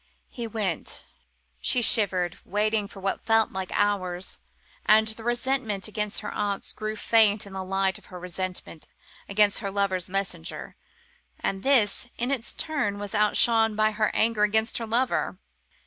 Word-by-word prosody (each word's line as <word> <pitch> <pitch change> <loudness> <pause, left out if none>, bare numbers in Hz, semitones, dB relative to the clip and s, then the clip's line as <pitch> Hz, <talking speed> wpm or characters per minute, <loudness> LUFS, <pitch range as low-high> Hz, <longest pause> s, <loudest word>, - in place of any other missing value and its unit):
He 235 -2 -5
went. 205 -6 -3 0.5
She 245 - +3
shivered, 185 -7 +5
waiting 210 +1 0
for 200 - -12
what 195 0 -2
felt 225 -1 +3
like 190 -1 -5
hours. 190 -3 -1 0.4
And 220 +1 +5
the 220 +1 -7
resentment 240 -4 -1
against 210 -1 -2
her - - -6
aunts 205 -1 -2
grew 215 0 -4
faint 215 -2 +3
in 200 - -11
the 190 0 -4
light 195 0 0
of - - -19
her 180 -2 -9
resentment 180 -2 -5 0.4
against 205 0 +3
her 200 - -3
lover's 195 -3 -1
messenger, 195 - -4 0.6
and 195 0 -2
this, 245 -3 +2
in 245 +3 -1
its 250 -4 -3
turn, 280 -11 -2
was 205 -1 -6
outshone 225 +1 +4
by 215 0 +2
her 215 0 +1
anger 225 -1 +2
against 220 +3 +2
her 230 - -5
lover. 245 +4 0
210 Hz, 155 wpm, -26 LUFS, 195-225 Hz, 0.6 s, shivered